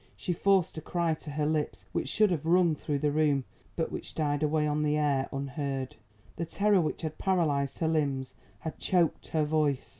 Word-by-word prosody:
She 180 Hz, -, -2 dB
forced 190 Hz, 0 st, +2 dB
a -, -, -9 dB
cry 170 Hz, 0 st, 0 dB
to 155 Hz, 0 st, -8 dB
her 150 Hz, +1 st, -1 dB
lips 155 Hz, -1 st, -1 dB
which -, -, -2 dB
should 215 Hz, -3 st, +3 dB
have 160 Hz, -2 st, -1 dB
rung 175 Hz, -1 st, +4 dB
through 145 Hz, -1 st, -2 dB
the 145 Hz, +1 st, +1 dB
room, 145 Hz, -2 st, +2 dB, 0.3 s
but 165 Hz, -, -1 dB
which -, -, -6 dB
died 145 Hz, -2 st, 0 dB
away 155 Hz, 0 st, +2 dB
on 150 Hz, 0 st, 0 dB
the 150 Hz, 0 st, +2 dB
air 140 Hz, -3 st, +1 dB
unheard. 135 Hz, -1 st, -3 dB, 0.4 s
The 170 Hz, -, -2 dB
terror 200 Hz, +2 st, +3 dB
which 160 Hz, -, -3 dB
had 155 Hz, -1 st, -4 dB
paralysed 155 Hz, -8 st, +1 dB
her 160 Hz, -, 0 dB
limbs 140 Hz, -5 st, 0 dB, 0.3 s
had 160 Hz, -, -6 dB
choked 175 Hz, -4 st, +1 dB
her 155 Hz, -1 st, +1 dB
voice. 150 Hz, -3 st, 0 dB
155 Hz, 200 wpm, -29 LUFS, 145-165 Hz, 0.4 s, rung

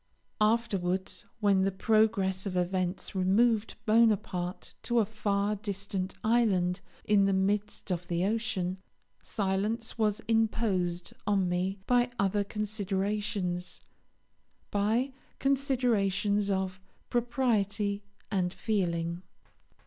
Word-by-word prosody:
Afterwards, 200 Hz, -5 st, 0 dB
when 200 Hz, -2 st, +4 dB
the 195 Hz, +1 st, +2 dB
progress 200 Hz, -2 st, +2 dB
of 185 Hz, -2 st, -2 dB
events 180 Hz, +1 st, -1 dB
removed 210 Hz, +4 st, +2 dB
Bonaparte 210 Hz, -5 st, +1 dB
to 240 Hz, -, -1 dB
a 225 Hz, -, +5 dB
far 205 Hz, -1 st, 0 dB
distant 195 Hz, -2 st, -3 dB
island 195 Hz, -6 st, +2 dB, 0.2 s
in 205 Hz, -1 st, +4 dB
the 195 Hz, -, +2 dB
midst 200 Hz, +1 st, -1 dB
of 175 Hz, 0 st, -2 dB
the 175 Hz, +1 st, 0 dB
ocean, 200 Hz, -4 st, -1 dB, 0.4 s
silence 210 Hz, +3 st, -2 dB
was 215 Hz, -1 st, +2 dB
imposed 210 Hz, -6 st, 0 dB
on 195 Hz, -3 st, +2 dB
me 180 Hz, +2 st, -1 dB
by 245 Hz, 0 st, +3 dB
other 200 Hz, 0 st, +1 dB
considerations, 200 Hz, -3 st, -2 dB, 0.9 s
by 220 Hz, +6 st, +1 dB, 0.3 s
considerations 225 Hz, -7 st, +1 dB
of 190 Hz, -1 st, -1 dB, 0.3 s
propriety 220 Hz, -5 st, 0 dB, 0.3 s
and 185 Hz, -3 st, 0 dB
feeling. 170 Hz, -5 st, -1 dB
200 Hz, 100 wpm, -30 LUFS, 185-220 Hz, 0.9 s, a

